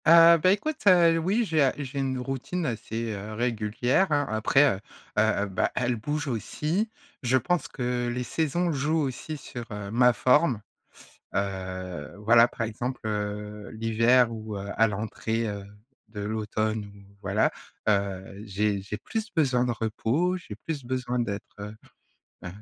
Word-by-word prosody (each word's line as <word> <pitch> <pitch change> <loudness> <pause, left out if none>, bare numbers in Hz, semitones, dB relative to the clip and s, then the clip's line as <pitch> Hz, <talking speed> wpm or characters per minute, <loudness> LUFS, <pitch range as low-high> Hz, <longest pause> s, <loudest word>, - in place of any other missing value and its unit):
Heu, 170 +1 +9
bah 185 - +5
écoute, 280 +9 0
heu, 170 -3 +6
oui 200 +8 +1
j'ai, 160 -5 +2
heu, 135 - +4
j'ai 140 -1 -4
une 135 -1 -1
routine 135 +7 -3
assez, 115 -2 -3
heu, 105 +2 -6
régulière, 120 - +1
hein. 145 -1 +2
Après, 110 +5 +3 0.2
heu - - -11 0.4
heu, 110 -2 +2
bah, 95 -2 0
elle 125 -1 +1
bouge 145 +7 -3
aussi. 150 - -1 0.3
Je 130 +1 +3
pense 175 +6 0
que 125 -2 -2
les 125 +1 -2
saisons 160 +7 0
jouent 150 +2 0
aussi 145 +3 -3
sur, 120 -3 -7
heu, 105 -1 -5
ma 125 +2 +5
forme. 130 -1 +3 0.7
Heu, 95 -4 -4
voilà, 115 +3 +6
par 120 - -8
exemple, 120 +4 -4
heu, 105 0 -4
l'hiver 115 +2 +3
ou 110 -2 -5
heu, 100 0 -6
à 115 - +5
l'entrée 110 +2 -2
heu, 100 -1 -5 0.4
de 110 -2 -7
l'automne 110 0 -1
ou 100 0 -18
voilà. 100 +2 +2 0.4
Heu, 100 -1 0
j'ai 100 0 0
j'ai 105 +2 -5
plus 220 - -4
besoin 130 -6 +3
de 125 - 0
repos, 120 +10 0
j'ai 110 - -9
plus 145 +5 -5
besoin 125 0 -2
d'être, 100 -4 -2 0.2
heu 105 +1 -7 0.7
heu, - - -4
115 Hz, 160 wpm, -27 LUFS, 105-140 Hz, 0.7 s, Heu